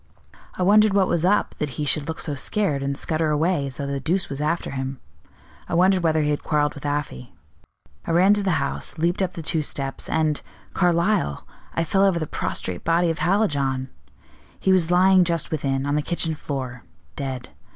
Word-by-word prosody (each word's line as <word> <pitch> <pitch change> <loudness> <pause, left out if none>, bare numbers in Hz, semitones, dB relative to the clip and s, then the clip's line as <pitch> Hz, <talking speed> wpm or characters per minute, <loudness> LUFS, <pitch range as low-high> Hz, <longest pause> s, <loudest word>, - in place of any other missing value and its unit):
I 185 - -1
wondered 210 +1 +5
what 195 -2 +4
was 170 -2 0
up 200 +3 +2
that 140 -5 -3
he 150 - -1
should 145 0 +1
look 160 - -4
so 150 - -1
scared, 145 +1 -1
and 140 0 -2
scutter 155 0 0
away 150 -1 +1
as 130 - -7
though 140 - -3
the 140 0 -2
deuce 175 +7 -1
was 140 +1 -5
after 165 +3 -1
him; 135 -1 -4 0.7
I - - -1
wondered 185 +1 +4
whether 160 -2 +2
he 150 - +1
had 145 - -1
quarreled 150 -1 +1
with 145 0 -6
Afy. 145 - -4 0.7
I - - -4
ran 180 +4 +5
to 205 - +1
the 190 -4 +1
house, 140 0 -2
leaped 170 +4 0
up 185 -1 -1
the 165 - -7
two 160 0 0
steps, 135 -2 -3
and 155 -2 +1 0.3
Carlyle 170 - +1 0.3
I 165 - +1
fell 195 +4 +2
over 195 -3 +3
the 160 - -2
prostrate 90 - -3
body 170 +1 +2
of 165 - -5
Hallijohn! 140 -9 +1 0.7
He 190 - +3
was 175 -3 +3
lying 185 +1 +5
just 170 -2 -1
within, 135 -3 -1
on 145 - -1
the 150 - +2
kitchen 165 0 -1
floor, 130 -5 -5 0.3
dead. 130 -3 -5
155 Hz, 200 wpm, -23 LUFS, 140-180 Hz, 0.7 s, wondered